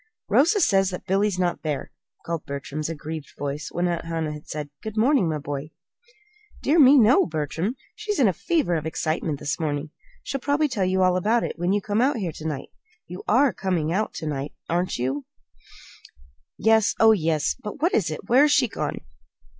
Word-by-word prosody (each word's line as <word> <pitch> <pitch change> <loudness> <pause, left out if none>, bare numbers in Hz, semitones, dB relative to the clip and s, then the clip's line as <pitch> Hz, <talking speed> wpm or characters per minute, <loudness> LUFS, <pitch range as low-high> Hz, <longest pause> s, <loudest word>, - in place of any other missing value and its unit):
"Rosa 375 +9 +4
says 195 - +3
that 180 0 -7
Billy's 195 0 +1
not 180 -1 0
there," 150 -4 -3 0.3
called 165 -1 -3
Bertram's 140 +2 -4
aggrieved 155 -1 -6
voice, 145 +1 -4
when 175 +1 0
Aunt 170 -1 -2
Hannah 165 -2 -2
had 150 0 -10
said, 150 -1 -5
"Good 220 0 -7
morning, 230 - +3
my 155 - -1
boy." 145 0 -5 0.9
"Dear 310 +4 +3
me, 280 0 +8
no, 240 0 +5
Bertram. 160 - -2 0.2
She's 425 -1 -3
in 255 - +4
a 190 - +2
fever 305 - 0
of 160 -1 -1
excitement 155 -1 -2
this 150 +1 -3
morning. 150 -1 -2 0.3
She'll 275 - -4
probably 290 +2 +2
tell 215 -8 -1
you 185 0 +2
all 185 -1 +3
about 220 +6 +2
it - - -4
when 175 +2 +1
you 205 +1 +1
come 210 +1 0
out 265 +1 +2
here 185 -6 -2
to 155 0 -7
night. 150 -4 -4 0.4
You 180 +2 -8
are 260 +4 +4
coming 170 -4 -1
out 215 +3 0
to - - -5
night, 145 -1 -4
aren't 175 +2 -1
you?" 130 +3 -2 1.3
"Yes; 220 -1 +3
oh, 225 0 +7
yes! 160 -7 +1
But 210 +5 -7
what 345 - +3
is 175 -6 +2
it? 155 - -6
Where's 280 +5 +5
she 280 -4 +4
gone?" - - -4
180 Hz, 195 wpm, -24 LUFS, 155-225 Hz, 1.3 s, me